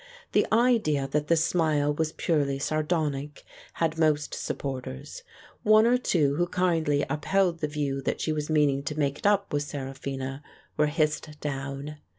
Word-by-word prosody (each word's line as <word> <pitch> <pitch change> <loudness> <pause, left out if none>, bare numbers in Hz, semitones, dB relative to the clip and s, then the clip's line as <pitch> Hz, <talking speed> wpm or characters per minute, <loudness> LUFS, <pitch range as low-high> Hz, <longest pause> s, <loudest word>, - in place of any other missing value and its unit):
The - - +3
idea 215 - +3
that 150 +1 -1
the 165 - +3
smile 155 -3 +2
was 155 +1 -1
purely 145 -4 0
sardonic 150 -1 -2 0.3
had 165 -1 -1
most 150 -2 +2
supporters: 130 - -5 0.4
one 215 +1 +6
or 245 +1 +4
two 150 - +1
who 175 +1 +1
kindly 165 -5 +1
upheld 175 +2 +1
the 150 - -1
view 145 -2 -2
that - - -2
she 155 - -1
was 150 0 -3
meaning 145 -3 +3
to 150 +2 -3
make 140 -1 0
it - - +1
up 200 -3 +2
with 145 - +1
Seraphina 135 -1 -5 0.3
were 150 - +3
hissed 155 0 0
80 - - -10
The 150 - -21
Dance 145 -2 -1
on 140 - -6
the 135 - -7
Beefsteak 150 +2 -6
down. 150 -1 -14
150 Hz, 185 wpm, -27 LUFS, 140-165 Hz, 0.4 s, one